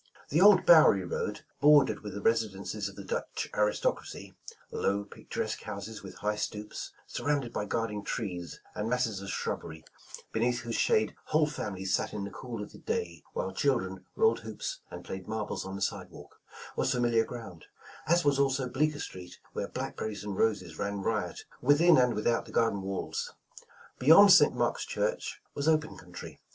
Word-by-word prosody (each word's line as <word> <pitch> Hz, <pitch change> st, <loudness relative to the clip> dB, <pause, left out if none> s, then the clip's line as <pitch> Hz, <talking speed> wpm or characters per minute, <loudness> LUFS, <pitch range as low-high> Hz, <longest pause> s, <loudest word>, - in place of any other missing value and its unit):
The 155 Hz, +5 st, +2 dB
old 200 Hz, -2 st, +7 dB
Bowery 150 Hz, -, +7 dB
road, -, -, -3 dB, 0.2 s
bordered 145 Hz, -1 st, +5 dB
with 105 Hz, -2 st, -7 dB
the 100 Hz, -, -6 dB
residences 105 Hz, -2 st, 0 dB
of 100 Hz, -, -13 dB
the 100 Hz, -, -8 dB
Dutch -, -, -3 dB
aristocracy, 105 Hz, 0 st, -1 dB, 0.2 s
— -, -, -29 dB
low, 100 Hz, +1 st, 0 dB
picturesque 100 Hz, -, -5 dB
houses 110 Hz, -1 st, -6 dB
with 95 Hz, -, -10 dB
high 105 Hz, 0 st, -2 dB
stoops, 105 Hz, 0 st, -5 dB
surrounded 140 Hz, -5 st, -1 dB
by 105 Hz, -, -2 dB
guarding 105 Hz, -1 st, -2 dB
trees 90 Hz, -8 st, -4 dB
and 105 Hz, +2 st, -3 dB
masses 115 Hz, -5 st, 0 dB
of 100 Hz, -, -7 dB
shrubbery, 80 Hz, -3 st, -4 dB, 0.5 s
beneath 120 Hz, +2 st, +1 dB
whose 120 Hz, -1 st, -5 dB
shade 110 Hz, -1 st, +2 dB
whole 155 Hz, 0 st, +3 dB
fami 105 Hz, -10 st, -5 dB
lies 95 Hz, -1 st, -1 dB
sat -, -, 0 dB
in 105 Hz, -, -3 dB
the 100 Hz, -, -5 dB
cool 115 Hz, -1 st, -6 dB
of 105 Hz, -, -10 dB
the -, -, -13 dB
day, 85 Hz, -2 st, -3 dB
while 95 Hz, -, -3 dB
children 95 Hz, -8 st, 0 dB
rolled 450 Hz, 0 st, +3 dB
hoops -, -, -5 dB
and -, -, -9 dB
played 95 Hz, -1 st, -6 dB
marbles 110 Hz, -3 st, -3 dB
on 95 Hz, -, -5 dB
the 100 Hz, -, -2 dB
sidewalk, -, -, -6 dB, 0.2 s
— -, -, -13 dB
was -, -, +1 dB
famil 120 Hz, -1 st, +1 dB
iar 115 Hz, -1 st, +5 dB
ground; 100 Hz, -9 st, -9 dB, 0.4 s
as 170 Hz, 0 st, +3 dB
was 140 Hz, -1 st, +3 dB
also 135 Hz, -1 st, +2 dB
Bleeeker 145 Hz, +4 st, 0 dB
Street, 90 Hz, -7 st, -8 dB, 0.2 s
where -, -, -3 dB
black -, -, -5 dB
berries 110 Hz, -1 st, -4 dB
and 105 Hz, -2 st, -4 dB
roses 95 Hz, -7 st, 0 dB
ran 100 Hz, 0 st, -2 dB
riot 105 Hz, -5 st, -2 dB, 0.2 s
within 150 Hz, +4 st, +6 dB
and 125 Hz, -1 st, +3 dB
witliout 115 Hz, +2 st, +1 dB
the -, -, -12 dB
gar 115 Hz, -1 st, +3 dB
den 100 Hz, -, -4 dB
walls. 95 Hz, 0 st, -4 dB, 0.6 s
^Beyond 165 Hz, +10 st, +8 dB
St. -, -, +7 dB
Mark's -, -, 0 dB
church -, -, -2 dB
was 140 Hz, +2 st, -2 dB
open 155 Hz, -1 st, +2 dB
country. 90 Hz, 0 st, -10 dB
110 Hz, 185 wpm, -30 LUFS, 100-135 Hz, 0.6 s, ^Beyond